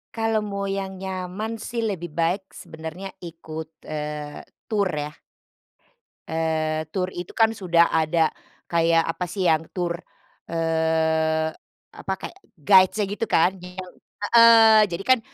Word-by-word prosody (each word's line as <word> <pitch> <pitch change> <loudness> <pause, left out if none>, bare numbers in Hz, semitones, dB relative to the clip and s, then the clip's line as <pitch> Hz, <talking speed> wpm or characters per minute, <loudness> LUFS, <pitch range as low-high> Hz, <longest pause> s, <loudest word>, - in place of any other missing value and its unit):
Kalau 225 -1 +1
mau 200 -1 -3
yang 195 -1 -3
nyaman 190 +4 -4
sih 230 +2 -4
lebih 175 -7 -3
baik 180 +4 0
sebenarnya 160 +5 -8
ikut, 160 -2 -8
eee, 150 -1 -5 0.3
tur 205 -3 +1
ya. 150 0 -3 1.2
Eee, 160 -1 -1
tur 185 -2 -1
itu 175 0 -6
kan 225 0 +2
sudah 170 -3 +3
ada 160 0 +2 0.4
kayak, 165 0 +3
apa 165 +2 -2
sih, 190 -3 0
yang 160 -1 +3
tur, 175 -2 -2 0.6
eee, 160 -1 +1 0.5
apa, 190 - -3
kayak - - -8 0.2
guides-nya, 190 +5 +5
gitu 205 +3 -4
kan, 180 +4 +4
iyau 180 0 -9 0.5
heeh. 225 -2 +8
Jadi 170 +3 -4
kan, 255 -1 +5
175 Hz, 130 wpm, -24 LUFS, 160-200 Hz, 1.2 s, heeh